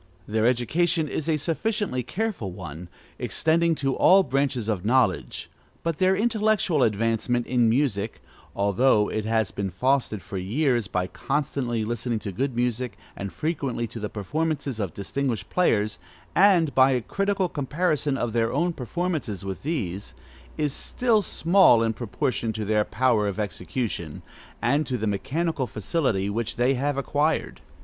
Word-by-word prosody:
Their 110 +2 +2
education 155 +7 +1
is 155 +2 -3
a 155 - +2
sufficiently 170 - -1
careful 185 - -3
one, 85 -1 -8 0.3
extending 165 +1 +2
to 135 -2 0
all 195 +1 +6
branches 135 - 0
of 105 -5 -1
knowledge; 115 -4 +1 0.4
but 165 -3 -2
their 185 +1 +4
intellectual 215 - +1
advancement 115 +2 +1
in 120 -3 +2
music 115 -4 0 0.4
(although 105 +2 +3
it 110 -1 -2
has 110 -3 +1
been 100 -1 -3
fostered 120 +1 0
for 95 - -5
years, 120 +3 +1
by 90 -3 -1
constantly 130 -1 -2
listening 115 +1 -2
to 105 -2 -5
good 130 +6 -2
music, 120 -2 -1 0.2
and 100 -1 -5
frequently 135 - -2
to 115 - -8
the 105 -1 -3
performances 140 - -2
of 95 -7 -3
distinguished 115 0 -3
players, 110 - +1 0.4
and 180 -6 +5
by 130 0 +6
a 125 - +1
critical 195 - 0
comparison 150 -1 0
of 120 -4 -2
their 115 -1 +1
own 170 +5 +1
performances 140 - -3
with 95 -1 -5
these) 105 - -3 0.4
is 150 -2 0
still 230 +3 +1
small 175 - +4
in 115 0 +1
proportion 115 +1 -2
to 110 -1 -3
their 105 0 +2
power 115 -3 +1
of 100 +1 -3
execution, 90 - -4 0.4
and 150 +2 +2
to 125 - -1
the 110 - -2
mechanical 135 - -1
facility 110 - -1
which 115 +2 -2
they 125 +2 +2
have 140 +2 -1
acquired. 145 +3 0
125 Hz, 150 wpm, -25 LUFS, 105-155 Hz, 0.4 s, all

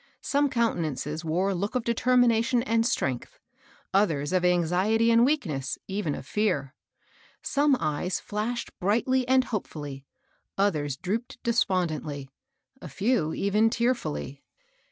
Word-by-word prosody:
Some 285 0 +2
countenances 160 - -1
wore 175 +5 0
a - - 0
look 200 +7 -3
of 250 - 0
deter 235 +2 +1
mination 235 0 +3
and 230 -2 +2
strengtJi, 130 - -1 0.7
others 165 -6 +1
of 185 -1 +2
anxiety 180 +6 +2
and 230 0 +5
weak 290 +1 +2
ness, 135 -5 -3
— - - -58
even 190 -7 -2
of - - -8
fear. 155 -8 -1 0.7
Some 285 -1 +2
eyes 155 +4 -1
flashed 220 +3 -3
brightly 240 +6 +1
and 260 0 +4
hopefolly, 145 - -5 0.5
others 150 -9 0
drooped 220 - -3
despondingly, 165 - 0 0.5
a - - -8
few 200 -7 0
even 210 +3 +2
tearftdly. 225 - -2
200 Hz, 135 wpm, -27 LUFS, 155-235 Hz, 0.7 s, and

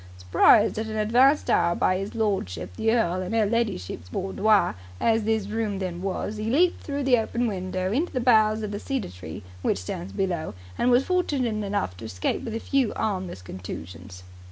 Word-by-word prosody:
Surprised 90 - +4
at 220 - -3
an 220 - -5
advanced 250 +7 +4
hour 170 0 +3
by - - +2
'is 195 +4 -5
lordship 95 - -2
the 225 - +1
earl 185 -6 +1
in 185 +4 -3
'er 220 -2 +3
ladyship's 200 - -2
boudoir, 195 - +2 0.3
as 225 -2 +2
this 220 -2 +1
room 210 -1 -2
then 180 -2 -4
was, 195 +2 -3
'e 215 +1 -2
leaped 345 +8 +3
through 285 -1 -3
the 255 -3 +4
open 235 +2 -1
window 185 -3 -2
into 300 +11 0
the 255 - -1
boughs 220 -3 +4
of 210 - -3
the 205 - -4
cedar 265 - -3
tree 90 +1 -9 0.2
which - - +1
stands 90 0 -6
below, 175 - -2 0.2
and 245 - +1
was 250 +2 +4
fortunate 270 - 0
enough 200 - -2
to 100 - -9
escape 90 -4 -2
with 225 -2 -4
a - - -2
few 265 -1 +1
'armless 185 - -3
contusions." 90 0 -8
210 Hz, 190 wpm, -25 LUFS, 170-230 Hz, 0.3 s, Surprised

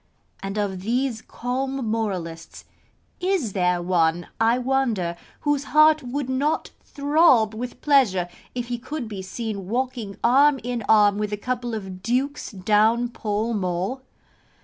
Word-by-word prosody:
And 195 +1 -4
of 195 -3 -2
these 240 +2 -1
calm 265 +1 -3
moralists, 185 -7 -4 0.5
is 360 - 0
there 180 -2 +1
one, 175 -1 +1
I 225 +2 +3
wonder, 245 -9 0 0.3
whose 290 -1 0
heart 305 0 +5
would 260 +1 -3
not 275 +4 0
throb 280 -6 +3
with 245 +3 -6
pleasure 235 -12 +3 0.3
if 245 -1 -4
he 240 -1 -2
could 260 0 -5
be 205 -3 -6
seen 200 0 -5
walking 240 -3 -3
arm 275 +3 +5
in 240 -2 -3
arm 210 -2 +5
with 210 -1 -2
a 210 - -2
couple 245 +1 -3
of 190 -3 -7
dukes 260 +7 -1
down 215 +4 +2
Pall 220 0 -2
Mall? 190 +5 -2
230 Hz, 140 wpm, -24 LUFS, 200-260 Hz, 0.5 s, heart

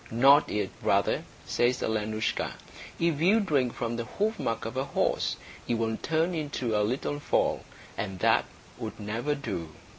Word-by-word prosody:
"Not 135 +6 +6
yet, 105 - -1
brother," - - +2 0.2
says 125 +1 +1
Alenoushka. 110 0 -1 0.5
"If 165 -3 +1
you 200 +7 +5
drink 140 - +1
from 115 0 -2
the 120 - -3
hoofmark 205 - 0
of 115 - -5
a 130 - 0
horse, - - 0 0.3
you 120 - +1
will 110 -1 0
turn 165 +3 0
into 145 -8 -2
a 105 - +3
little 130 +6 -1
foal, - - +1 0.3
and 95 -2 -4
that - - +3 0.3
would - - -6
never 115 +8 -1
do." 85 - -4
125 Hz, 155 wpm, -28 LUFS, 110-150 Hz, 0.5 s, Not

